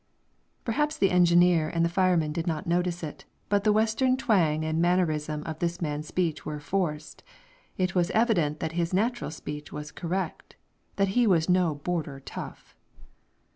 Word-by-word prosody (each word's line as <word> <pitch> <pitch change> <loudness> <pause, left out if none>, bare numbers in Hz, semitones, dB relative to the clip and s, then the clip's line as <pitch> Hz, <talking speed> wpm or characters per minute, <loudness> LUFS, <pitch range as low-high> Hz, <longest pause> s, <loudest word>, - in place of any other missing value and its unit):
Perhaps 295 +6 0
the 195 - +3
engineer 175 -2 +4
and 170 0 0
fireman 175 -4 +2
did 165 +2 -3
not 160 -3 -2
notice 175 0 0
it, 150 - -7 0.2
but 200 0 +2
the 215 - +4
Western 225 +5 +2
twang 165 -11 +2
and 160 +1 0
mannerism 155 -4 +1
of 160 -1 -6
this 170 0 -1
man's 150 -2 -3
speech 170 -3 -1
were 150 -1 -5
forced; 150 -1 -3 0.6
it 185 -1 0
was 175 -1 +2
evident 175 -10 +1
that 160 - -2
his 170 +1 -1
natural 235 +5 0
speech 150 -1 -7
was 150 0 -7
correct 180 0 -4 0.4
that 195 -1 +1
he 240 +4 +3
was 165 -5 +3
no 180 -4 +3
border 150 -2 -3
tough. - - -9
170 Hz, 160 wpm, -27 LUFS, 155-190 Hz, 0.6 s, engineer